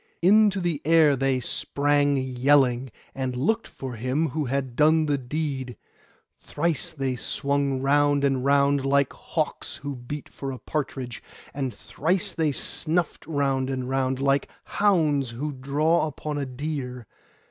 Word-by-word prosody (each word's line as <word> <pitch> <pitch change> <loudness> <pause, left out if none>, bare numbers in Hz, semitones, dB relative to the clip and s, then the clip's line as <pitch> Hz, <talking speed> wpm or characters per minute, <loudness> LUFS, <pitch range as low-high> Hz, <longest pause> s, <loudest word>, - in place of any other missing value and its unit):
Into 205 +1 +5
the 170 -5 -1
air 160 -3 +5
they 135 0 +1
sprang 145 +3 +1
yelling 130 0 +2 0.2
and 130 -2 -3
looked 220 - 0
for 130 -2 -7
him 130 +7 -1
who 150 +2 -2
had 130 -1 -2
done 155 +2 +4
the 145 -2 0
deed. 130 -2 -4 0.6
Thrice 155 -1 -2
they 135 -3 -2
swung 140 +2 -1
round 145 0 +3
and 135 -2 +1
round, 140 0 +3
like 140 0 +2
hawks - - -3
who 140 0 -6
beat 130 +4 -7
for 135 -1 -6
a 130 - -6
partridge; 130 -5 -4 0.3
and 135 -3 -2
thrice 180 - -1
they 160 -3 +1
snuffed 165 +3 -2
round 135 -4 0
and 130 -2 -3
round, 130 0 0
like 140 0 +1
hounds 155 - +2
who 135 +6 -4
draw 150 +5 +1
upon 150 0 -4
a 140 - -3
deer. 130 -2 -5
140 Hz, 145 wpm, -25 LUFS, 130-150 Hz, 0.6 s, Into